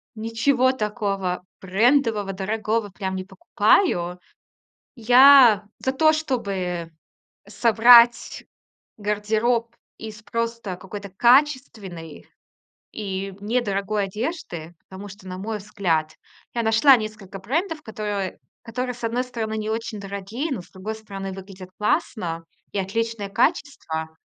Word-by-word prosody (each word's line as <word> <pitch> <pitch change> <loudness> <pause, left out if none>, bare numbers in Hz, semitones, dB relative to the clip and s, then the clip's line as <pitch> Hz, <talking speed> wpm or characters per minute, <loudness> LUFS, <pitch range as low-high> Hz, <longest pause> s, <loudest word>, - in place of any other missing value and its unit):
ничего 235 +4 +1
такого 200 -6 -2 0.2
брендового, 215 0 +2
дорогого 215 +2 -2
прям 190 0 -4
не 185 0 -5
покупаю. 190 - +1 0.8
Я 245 -2 +7
за 260 - -1
то, 310 +3 +4
чтобы 195 - -3 0.6
собрать 235 +1 +5 0.6
гардероб 215 +3 0 0.2
из 215 -1 -9
просто 230 -4 -3
какой-то 200 +2 -8
качественной 220 - +1 0.7
и 195 -2 -5
недорогой 205 -2 -1
одежды. 195 - -5
Потому 190 +2 -9
что, 195 -1 -13
на 185 0 -6
мой 215 +3 -4
взгляд, 175 -7 -1 0.4
я 235 - -1
нашла 225 +5 +6
несколько 215 -4 -6
брендов, 320 - -2
которые 210 -4 -4 0.3
которые, 250 +2 -4
с 240 - -14
одной 235 +2 0
стороны, 225 -3 -4
не 215 0 -3
очень 225 -2 -4
дорогие, 200 +9 -5
но, 230 -9 -3
с - - -18
другой 200 +4 -6
стороны, 195 -3 -7
выглядят 190 -1 -11
классно, 185 - -1 0.3
и - - -4
отличное 210 +2 -2
качество. 195 - -1
215 Hz, 115 wpm, -23 LUFS, 195-235 Hz, 0.8 s, Я